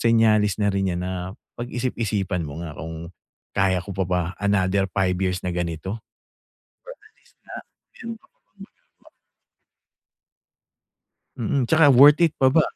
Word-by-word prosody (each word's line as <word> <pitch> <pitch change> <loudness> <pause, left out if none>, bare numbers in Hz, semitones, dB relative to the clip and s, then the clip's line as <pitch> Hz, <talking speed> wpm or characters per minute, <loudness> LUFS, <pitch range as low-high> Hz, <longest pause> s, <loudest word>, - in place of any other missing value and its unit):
senyales 110 -3 +3
na 105 -1 +1
rin 95 0 0
'yan 90 - -3
na 95 - -3 0.5
pag-isip-isipan 110 -6 -2
mo 80 +4 -7
nga 80 - -7
kung, 80 +2 -8 0.4
kaya 95 -2 +1
ko 100 - -9
pa 95 +1 -1
ba 90 0 +1 0.2
another 100 -1 +1
5 90 -1 0
years 90 -1 -1
na 90 - -1
ganito. 85 +4 -4 1.0
Pero, 425 - -20
at 440 - -37
least - - -29
na - - -12 0.4
meron 230 0 -7
ka - - -25
pang - - -48
magagawa? 485 - -18 2.3
Mm, 140 -7 -1
'tsaka 160 +1 +5
worth 145 +5 +7
it 165 - +5
pa 130 - +4
ba, 150 +4 +4
100 Hz, 150 wpm, -23 LUFS, 90-125 Hz, 2.3 s, worth